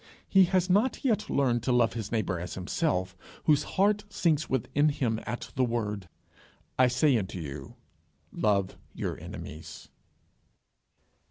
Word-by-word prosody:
He 190 -1 +6
has 185 0 +1
not 210 +9 +2
yet 215 -4 +1
learned 125 -4 +2
to 125 - -1
love 120 -2 +3
his 110 -3 -5
neighbour 100 -6 -1
as 90 - -6
himself 95 - -1 0.3
whose 150 -2 +4 0.2
heart 205 +2 +3
sinks 155 -6 +1
within 140 +4 +2
him 120 -6 -1
at 120 +2 -5
the 130 - +2
word, 105 -6 -2 0.7
I 130 - +7
say 130 +3 +3
unto 95 -2 -5
you, 70 -4 -7 0.6
Love 100 -3 0 0.2
your - - -3
enemies. 75 0 -9
120 Hz, 140 wpm, -28 LUFS, 100-155 Hz, 0.7 s, I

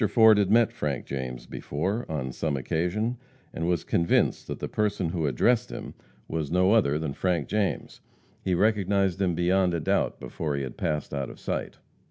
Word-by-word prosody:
Ford 110 -1 +6
had 100 -2 +2
met 115 +1 +4
Frank 70 -4 -3
James 65 -2 -5
before, 95 +11 -3
on 65 -4 -2
some 70 +2 -2
occasion, 90 - -1 0.4
and 80 - -2
was 90 -1 +1
convinced 85 0 +1
that - - -4
the - - -4
person 105 -5 0
who 80 -3 -1
addressed 110 - +2
him - - -7 0.3
was 80 -3 -2
no 90 +3 +3
other 75 -11 +3
than 75 -3 -3
Frank 85 -4 0
James. 105 -2 -2 0.4
He 95 -2 0
recognized 100 -1 +2
him 90 -3 +1
beyond 90 +1 +2
a - - 0
doubt 75 - 0
before 75 -3 -3
he 70 - -2
had 65 -2 -6
passed 75 -3 -2
out 70 -2 -2
of - - -11
sight. - - -4
85 Hz, 185 wpm, -27 LUFS, 75-100 Hz, 0.4 s, Ford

